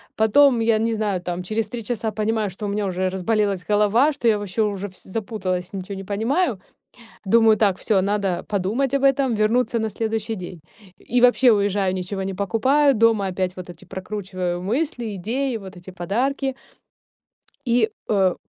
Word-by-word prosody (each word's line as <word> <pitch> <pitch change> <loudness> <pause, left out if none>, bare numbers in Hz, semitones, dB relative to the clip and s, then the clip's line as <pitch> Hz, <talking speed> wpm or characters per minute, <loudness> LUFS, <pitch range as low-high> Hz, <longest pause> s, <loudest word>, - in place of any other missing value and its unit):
Потом 235 +3 +4
я, 225 -1 +3
не 225 0 0
знаю, 205 -4 -1
там 180 0 -4
через 215 +3 -2
три 240 -2 -5
часа 225 -1 -2
понимаю, 215 -1 -1
что 205 +3 -7
у - - -2
меня 205 0 -1
уже 185 0 -1
разболелась 195 0 0
голова, 215 +8 +3
что 250 -4 -2
я 215 -2 +4
вообще 205 +2 -3
уже 205 -1 -1
вс 185 - -12
запуталась, 190 -3 -3
ничего 195 +1 -5
не - - -6
понимаю. 230 - 0 0.7
Думаю 225 +1 +5
так: 200 -4 +2
"Всё, 200 -3 +2
надо 195 -2 -1
подумать 215 +8 0
об 275 - +1
этом, 270 -3 +3
вернуться 230 +3 +1
на 220 -1 -1
следующий 220 +1 -2
день". 175 -2 -8 0.5
И 245 - +5
вообще 250 0 +5
уезжаю, 200 -2 +1
ничего 190 +1 -4
не 190 0 -3
покупаю, 260 +8 +2
дома 220 -3 +3
опять 185 0 -2
вот 180 -1 -8
эти 175 - -13
прокручиваю 185 -2 -4
мысли, 240 - -2
идеи, 245 +6 -2
вот 190 -2 -11
эти 175 +1 -11
подарки 255 +10 -1 1.1
и 235 -2 +2 0.2
э, 190 -4 +3
210 Hz, 170 wpm, -22 LUFS, 190-230 Hz, 1.1 s, Думаю